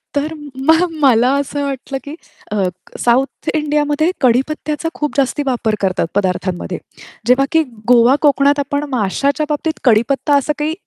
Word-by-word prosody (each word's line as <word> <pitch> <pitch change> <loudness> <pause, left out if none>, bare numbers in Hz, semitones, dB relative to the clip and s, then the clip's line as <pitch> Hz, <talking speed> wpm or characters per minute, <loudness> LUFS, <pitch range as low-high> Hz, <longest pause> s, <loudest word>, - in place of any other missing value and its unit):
तर 295 +2 -1 0.3
मग 320 +2 +5 0.2
मला 250 -2 +4
असं 285 +1 -3
वाटलं, 270 0 -4
की 290 +2 -8 0.4
अ, 210 -2 0 0.4
साउथ 250 +3 0
इंडियामध्ये 300 +1 +1
कडीपत्त्याचा 295 +5 0
खूप 295 -1 -2
जास्ती 275 +1 +1
वापर 235 -4 0
करतात 185 -3 0
पदार्थांमध्ये. 185 -2 -1 0.5
जेव्हा 255 +2 +4
की 320 -1 +3 0.3
गोवा 245 +2 +6
कोकणात 285 0 +3
आपण 285 +1 -1
माशाच्या 270 +6 0
बाबतीत 305 +1 -2
कडीपत्ता 255 +5 +3
असं 290 +2 0
काही, 305 +1 -1
280 Hz, 140 wpm, -17 LUFS, 245-295 Hz, 0.5 s, गोवा